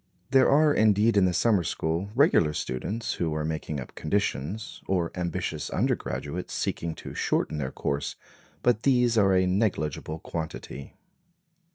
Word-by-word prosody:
There 135 -1 +5
are 150 +1 +5
indeed 110 0 +4
in 100 -2 +5
the 90 - +2
summer 105 -2 +3
school 85 +4 -2
regular 130 - +4
students 105 - -3
who 80 -3 0
are 75 0 -1
making 80 -2 -3
up 65 - -8
conditions, 100 +2 -2
or 90 -3 0
ambitious 90 -2 -3
undergraduates 85 +5 -2
seeking 80 -1 -2
to - - -9
shorten 75 - 0
their 65 -3 -2
course; 70 0 -2 0.5
but 120 -3 +3
these 125 -3 +3
are 95 -3 +4
a 95 0 +4
negligible 90 -6 -1
quantity. 80 -4 -6
90 Hz, 145 wpm, -27 LUFS, 80-110 Hz, 0.5 s, There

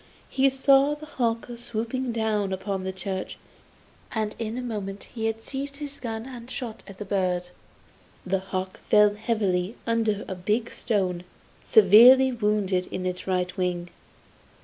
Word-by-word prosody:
He 275 0 +4
saw 275 +2 +4
the 300 +1 -10
hawk 230 -6 -1
swooping 235 +2 -3
down 215 -3 0
upon 190 0 -3
the 190 - -2
church, 190 0 -5 0.7
and 215 -2 -2
in 225 +1 -3
a 250 - -3
moment 205 -4 -5
he 225 -2 -1
had 225 0 -3
seized 280 +1 -5
his 285 -1 -6
gun 225 -2 -4
and 245 -2 -9
shot 235 -4 -6
at 195 -2 -11
the 210 - -6
bird. 180 -3 -1 0.7
The 190 +1 0
hawk 190 0 -5
fell 210 -1 +4
heavily 205 -2 -1
under 225 -3 0
a - - -3
big 210 +6 -1
stone, 185 -6 -1 0.4
severely 240 +6 +7
wounded 210 -5 0
in 185 - -5
its 180 +1 -4
right 180 -1 -1
wing. 175 -1 -2
215 Hz, 150 wpm, -26 LUFS, 190-235 Hz, 0.7 s, severely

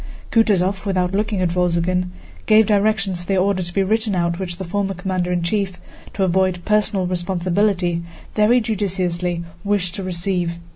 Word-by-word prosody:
Kutúzov, 195 -4 +2
without 185 -1 0
looking 205 -1 0
at 175 -2 +1
Wolzogen, 180 +1 +1 0.4
gave 220 0 +6
directions 200 -3 +1
for 175 - -11
the 195 - +1
order 190 0 +2
to 175 -1 -4
be 195 +2 +1
written 215 +1 +1
out 170 0 0
which 175 -2 -4
the 190 - -5
former 195 +2 -2
commander 180 -1 -2
in 175 -1 0
chief, 190 0 -1 0.4
to 195 - 0
avoid 185 -1 +1
personal 210 -3 +2
responsibility, 180 0 0 0.3
very 220 +4 +4
judiciously 180 -5 -1 0.2
wished 200 -4 0
to 195 - -5
receive. 180 -1 -1
185 Hz, 160 wpm, -20 LUFS, 175-200 Hz, 0.4 s, gave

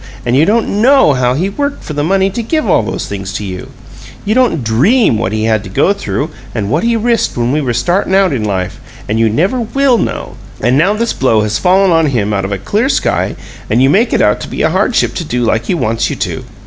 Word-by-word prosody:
And 120 +1 +1
you 145 +4 +4
don't 215 -1 +1
KNOW 265 - +5
how 125 -1 +1
he 175 +7 0
worked 285 +8 -3
for 155 - -6
the 145 0 -1
money 195 +3 +1
to 235 - -3
give 280 +3 -1
all 170 - +3
these 110 - -4
things 100 -1 -5
to 105 - -4
you! 95 -2 -7 0.6
You 210 - +1
don't 240 - +1
DREAM 125 - +2
what 105 - -1
he 110 0 -2
had 110 -1 +1
to 95 - -9
go 185 - +2
through 160 -6 -4 0.2
and 105 -2 -2
what 155 - +1
he 235 0 +1
risked 230 - 0
when 120 +1 0
we 150 +2 0
were 130 -4 -1
startin' 175 - 0
out 195 -5 +3
in 120 -5 -2
life; 95 -3 -3 0.3
and 110 +2 -1
you 115 -1 +3
never 185 - 0
WILL 255 +1 +1
know! - - -4 0.2
And 120 +3 +1
now 180 +9 +2
this 235 +2 -1
blow 115 -5 +2
has 105 0 -1
fallen 190 +1 +3
on 165 -1 +3
him 110 -6 -1
out 100 -1 -1
of 100 - -4
a 100 - -1
clear 215 - -1
sky, - - 0 0.3
and 115 - +2
you 135 +2 +4
make 225 +8 +2
it - - +2
out - - +2
to - - -6
be - - -3
a - - +2
hardship - - +1
to 175 - -4
do 125 -5 -2
like 115 0 0
he - - 0
wants 115 -6 -1
you - - -3
to! - - -4
145 Hz, 255 wpm, -13 LUFS, -, 0.6 s, KNOW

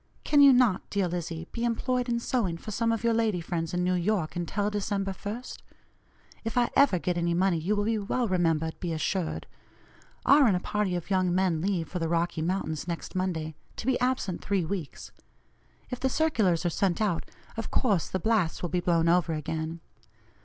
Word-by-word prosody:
Can 290 -1 +4
you 280 -1 +9
not, 245 -7 +3
dear 200 -2 0
Lizzie, 170 -1 -4
be 235 - -4
employed 245 +1 0
in 235 0 +1
sewing 225 -8 -1
for 215 - -8
some 230 +2 +1
of 225 0 -2
your 230 0 +3
lady 220 -5 +1
friends 165 -1 -3
in 180 0 0
New 180 +1 +2
York 180 -2 0
until 200 +4 -1
December 200 -1 -1
1st? 215 +6 -6 0.8
If 225 +2 -3
I 240 -1 +3
ever 275 -10 +5
get 175 0 -1
any 170 0 +1
money 180 -1 +2
you 190 +7 0
will 205 - 0
be 220 +1 0
well 230 +4 -1
remembered, 165 -4 0
be 175 -3 -2
assured. 160 +2 -2 0.8
R. 280 -1 +7
and 200 - +3
a - - -2
party 205 -1 -1
of 175 +3 -5
young 185 -2 +2
men 180 -4 +1
leave 180 -3 -1
for 180 - -4
the 165 -1 -1
Rocky 170 -1 0
Mountains 165 -2 -2
next 170 -1 -5
Monday, 170 -4 -2 0.2
to - - -6
be 260 -1 +2
absent 250 -8 -1
three 195 -4 0
weeks. 170 -4 -5 0.8
If 250 - -3
the 265 - +1
circulars 215 - +1
are 175 - +2
sent 185 0 0
out, 205 -6 0 0.3
of 225 - -4
course 205 - +1
the - - -1
blasts 195 -4 0
will 175 - -1
be 180 - 0
blown 170 -2 +2
over 170 -1 +3
again. 160 +2 -4
185 Hz, 200 wpm, -28 LUFS, 170-225 Hz, 0.8 s, you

